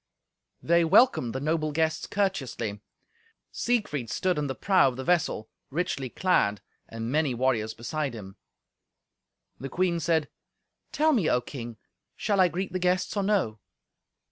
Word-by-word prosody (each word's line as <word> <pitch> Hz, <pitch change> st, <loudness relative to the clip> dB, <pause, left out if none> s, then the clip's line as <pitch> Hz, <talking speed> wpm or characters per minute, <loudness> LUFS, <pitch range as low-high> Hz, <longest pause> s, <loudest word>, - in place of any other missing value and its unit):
They 170 Hz, +1 st, +4 dB
welcomed 170 Hz, -, +4 dB
the -, -, -1 dB
noble 155 Hz, +1 st, 0 dB
guests 160 Hz, +1 st, 0 dB
courteously. 135 Hz, -, -2 dB, 0.7 s
Siegfried 175 Hz, -, -1 dB
stood 180 Hz, +4 st, 0 dB
in 145 Hz, -, -1 dB
the 130 Hz, -, -3 dB
prow 190 Hz, -7 st, +4 dB
of 130 Hz, -, -2 dB
the 130 Hz, -, -5 dB
vessel, 165 Hz, -9 st, +1 dB, 0.2 s
richly 140 Hz, -4 st, -2 dB
clad, 110 Hz, -, +1 dB, 0.3 s
and 115 Hz, +1 st, -5 dB
many 150 Hz, -3 st, +1 dB
warriors 115 Hz, -3 st, 0 dB
beside 130 Hz, +3 st, -3 dB
him. 95 Hz, -3 st, -9 dB, 1.2 s
The 135 Hz, -, -6 dB
queen 175 Hz, 0 st, 0 dB
said, 160 Hz, -1 st, +1 dB, 0.6 s
"Tell 310 Hz, +1 st, +3 dB
me, 205 Hz, -, +2 dB
O 125 Hz, -, +3 dB
King, 120 Hz, -3 st, -8 dB, 0.4 s
shall 205 Hz, -2 st, 0 dB
I 185 Hz, -, +6 dB
greet 180 Hz, +3 st, -4 dB
the 185 Hz, -, -1 dB
guests, 180 Hz, +2 st, 0 dB
or 200 Hz, -, +1 dB
no?" 190 Hz, -, 0 dB
155 Hz, 145 wpm, -27 LUFS, 125-185 Hz, 1.2 s, I